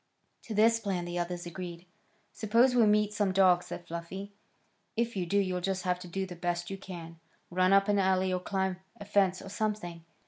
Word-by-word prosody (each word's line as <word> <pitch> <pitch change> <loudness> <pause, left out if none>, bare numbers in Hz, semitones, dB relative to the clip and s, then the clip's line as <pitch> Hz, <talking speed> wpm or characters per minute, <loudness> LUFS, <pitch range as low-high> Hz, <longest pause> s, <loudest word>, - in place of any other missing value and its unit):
To 220 - -5
this 225 +2 +5
plan 190 -5 -2
the 175 0 -3
others 175 0 -3
agreed. 175 0 -7 0.5
"Suppose 230 +4 +3
we 235 -3 +5
meet 210 0 +3
some 205 -2 +1
dogs?" 185 -2 +4
said 175 - -7
Fluffy. 185 +4 -6 0.6
"If 235 0 0
you 180 -3 -2
do, 200 - +1
you'll 185 -2 +1
just 190 +1 -1
have 180 -1 0
to 180 - -9
do 190 +2 -2
the 180 -1 -8
best 175 +1 -2
you 195 - -4
can. 170 -4 -9 0.3
Run 185 +1 +3
up 195 +1 +5
an 205 -1 +3
alley, 190 -1 +2
or 180 - 0
climb 190 0 -1 0.2
a 205 - -8
fence 195 -2 +2
or - - -8
something. 200 -5 -3
190 Hz, 205 wpm, -30 LUFS, 175-205 Hz, 0.6 s, this